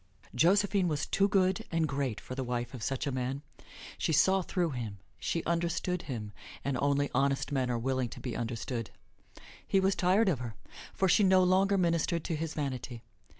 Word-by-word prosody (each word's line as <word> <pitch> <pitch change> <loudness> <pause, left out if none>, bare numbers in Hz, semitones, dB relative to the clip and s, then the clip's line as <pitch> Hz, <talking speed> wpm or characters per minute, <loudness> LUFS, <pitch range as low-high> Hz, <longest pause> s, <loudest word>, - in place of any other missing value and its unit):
Josephine 190 +6 +3
was 150 -3 -1
too 195 - +2
good 190 -2 +2
and 165 -1 +1
great 135 -5 -2
for 130 - -8
the 130 0 -3
wife 120 0 -3
of 125 - -7
such 135 +3 -2
a 140 - -1
man. 130 +2 -3 0.6
She - - 0
saw 190 +5 +4
through 175 -2 -1
him. 115 -6 -5 0.2
She 165 - -1
understood 170 +1 -1
him, 110 -9 -5 0.3
and 140 -1 0
only 145 0 +1
honest 140 +1 +1
men 130 -3 0
are 120 - 0
willing 130 +1 -1
to - - -9
be 125 - -4
understood. 115 0 -3 0.8
He 195 - +3
was 190 +1 +3
tired 190 +5 +3
of 165 -10 +2
her, 120 -4 -6 0.4
for 190 - +1
she 190 +3 +5
no 185 -1 +5
longer 190 +2 +3
ministered 170 -2 +1
to 165 - -2
his 160 +1 -4
vanity. 130 -5 -4
145 Hz, 190 wpm, -31 LUFS, 125-180 Hz, 0.8 s, she